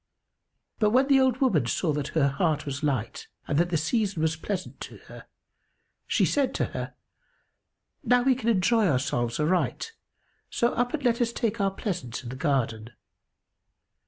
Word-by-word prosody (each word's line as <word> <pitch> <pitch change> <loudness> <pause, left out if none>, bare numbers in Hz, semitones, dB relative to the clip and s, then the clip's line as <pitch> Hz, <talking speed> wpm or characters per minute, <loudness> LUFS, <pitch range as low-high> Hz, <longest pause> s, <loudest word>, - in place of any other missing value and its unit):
But 215 -2 +4
when 260 +5 +3
the 275 -1 +6
old 260 -1 +2
woman 170 - +2
saw 155 +4 0
that 145 -1 -2
her 140 -3 +4
heart 155 +1 0
was 140 -1 -4
light 130 -7 -2 0.2
and 145 - +1
that 175 +1 +2
the 170 - +1
season 195 +1 0
was 160 0 +1
pleasant 185 +3 -5
to - - -8
her, - - -12 0.8
she - - +2
said 280 -2 0
to - - +1
her, - - -5 1.1
"Now 245 0 +3
we 265 0 +4
can 240 -2 -2
enjoy 220 +1 +3
ourselves 125 -4 0
aright: 180 - 0 0.6
so 235 - +1
up 245 +4 0
and 290 - -7
let 240 -1 +2
us 235 -1 +1
take 230 -2 -2
our 195 - +3
pleasance 175 - -5
in 120 - -7
the 130 - -6
garden." 125 -6 -1
180 Hz, 170 wpm, -26 LUFS, 140-235 Hz, 1.1 s, the